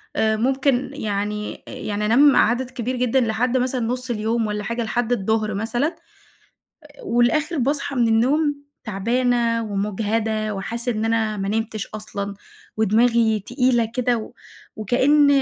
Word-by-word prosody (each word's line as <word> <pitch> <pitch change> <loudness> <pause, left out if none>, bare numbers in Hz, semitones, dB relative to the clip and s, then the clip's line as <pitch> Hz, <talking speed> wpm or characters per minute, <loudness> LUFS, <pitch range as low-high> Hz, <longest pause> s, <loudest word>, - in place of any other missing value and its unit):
آآ 220 0 +2
ممكن 265 +2 +1
يعني 210 -4 -3
يعني 210 0 -3
أنام 270 +6 +5
عدد 245 +3 +2
كبير 250 +1 -3
جدًا 250 +1 +2
لحد 235 +2 +1
مثلًا 255 0 0
نُص 250 +2 -3
اليوم 225 0 0
والّا 210 0 -3
حاجة، 235 +3 -2
لحد 240 +1 -1
الضهر 215 -1 0
مثلًا، 240 - -1 1.1
والآخر 300 - +1
باصحى 280 +2 -1
من 235 -2 +3
النوم 285 +6 +2 0.2
تعبانة 230 +2 +1
ومجهدة 215 +1 -1
وحاسّة 235 +5 -3
إن 215 0 -2
أنا 225 -1 0
ما 195 -1 -3
نمتش 220 0 -2
أصلًا، 205 -2 -6 0.4
ودماغي 220 +1 +3
تقيلة 245 -1 +2
كده 245 -1 +1
و 220 - -8 0.4
وكأن 265 +7 +3
230 Hz, 130 wpm, -22 LUFS, 215-250 Hz, 1.1 s, أنام